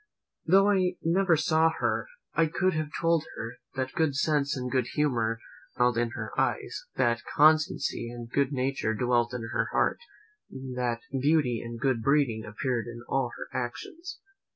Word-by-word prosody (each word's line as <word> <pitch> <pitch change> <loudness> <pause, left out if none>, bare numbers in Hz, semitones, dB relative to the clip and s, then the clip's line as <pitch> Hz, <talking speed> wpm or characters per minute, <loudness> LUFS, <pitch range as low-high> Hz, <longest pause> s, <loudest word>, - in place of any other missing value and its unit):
Though 195 +4 +6
I 185 -2 +2
never 175 0 +3
saw 160 +1 +3
her, - - 0 0.3
I 165 - +3
could 185 +4 +1
have 155 -1 -2
told 165 -2 +2
her, 115 +1 -6 0.2
"that 130 0 -2
good 160 -4 +1
sense 145 -2 +1
and 125 -1 -4
good 125 -2 +1
humour 120 -7 +1 0.4
smiled 125 -1 +2
in 120 0 +1
her - - -5
eyes; - - -1
that 120 -2 +2
constancy 155 -5 +3
and 120 -1 -7
good 140 +3 +1
nature 130 -4 -1
dwelt 120 +1 +1
in 125 -2 -4
her 115 -1 +1
heart; - - +1 0.5
that 125 -3 -3
beauty 135 -3 +2
and 115 0 -7
good 130 -2 +1
breeding 135 -4 +2
appeared 120 +2 -2
in 120 0 -8
all 135 -3 0
her - - -7
actions." 335 - -5
130 Hz, 160 wpm, -28 LUFS, 120-155 Hz, 0.5 s, Though